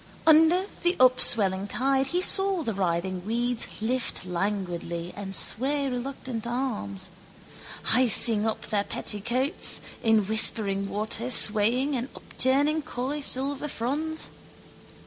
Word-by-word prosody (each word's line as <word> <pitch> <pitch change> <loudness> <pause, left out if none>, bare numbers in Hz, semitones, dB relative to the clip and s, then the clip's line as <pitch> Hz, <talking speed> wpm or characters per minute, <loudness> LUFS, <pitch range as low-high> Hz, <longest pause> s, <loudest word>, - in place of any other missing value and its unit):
Under 325 +4 +3 0.2
the 350 +1 0
upswelling 210 -6 +8
tide 270 +4 -1
he 355 +5 -1
saw 385 -3 +3
the 225 - -4
writhing 185 -1 -4
weeds 240 +3 -3
lift 235 -3 -3
languidly 175 -2 -5
and 195 -1 -7
sway 280 +8 -1
reluctant 250 -2 -7
arms, 235 - -5 0.7
hising 225 -3 +3
up 220 - -5
their 205 -2 -2
petticoats, 235 - -3 0.2
in 220 -2 +1
whispering 200 -2 +1
water 215 +3 -3
swaying 245 +5 +3
and 250 +2 -5
upturning 285 +4 -1
coy 270 +2 -6
silver 275 +1 -2
fronds. 300 +6 -4
240 Hz, 110 wpm, -24 LUFS, 205-275 Hz, 0.7 s, upswelling